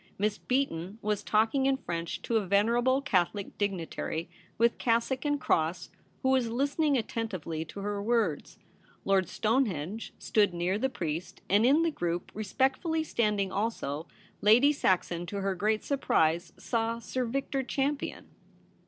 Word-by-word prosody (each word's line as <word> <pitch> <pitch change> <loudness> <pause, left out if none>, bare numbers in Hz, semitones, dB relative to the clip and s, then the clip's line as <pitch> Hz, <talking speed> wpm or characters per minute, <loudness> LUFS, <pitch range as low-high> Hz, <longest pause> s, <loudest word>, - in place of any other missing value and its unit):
Miss 210 +1 0
Beaton 210 -8 -1
was 210 -1 0
talking 225 +6 +2
in 270 -1 +2
French 170 -6 -4
to 230 - +1
a 205 -3 -1
venerable 240 +7 +3
Catholic 195 -3 0
dignitary 175 -4 -2 0.3
with 235 +1 +2
cassock 235 +4 +1
and 290 -1 +1
cross, 160 -4 0 0.3
who 260 - +3
was 260 -3 +3
listening 285 +4 +1
attentively 185 -9 -3
to 200 +5 -8
her 205 0 -2
words. 215 -8 0 0.5
Lord 190 -3 +2
Stonehenge 215 - -1
stood 205 -5 +2
near 180 +4 0
the 265 - +1
priest, 165 - -4
and 210 +5 +4
in 295 +5 +5
the 335 - +1
group, 175 - -3
re 215 - -4
spectfully 270 - +1
standing 210 -7 0
also, 180 -8 -2 0.3
Lady 245 +8 +6
Saxon, 175 - 0
to 200 +1 -4
her 195 0 0
great 215 +4 0
surprise, 170 - +1
saw 230 0 -1
Sir 255 +2 -3
Victor 270 +3 -1
Champion. 275 +2 -2
215 Hz, 145 wpm, -29 LUFS, 185-260 Hz, 0.5 s, Lady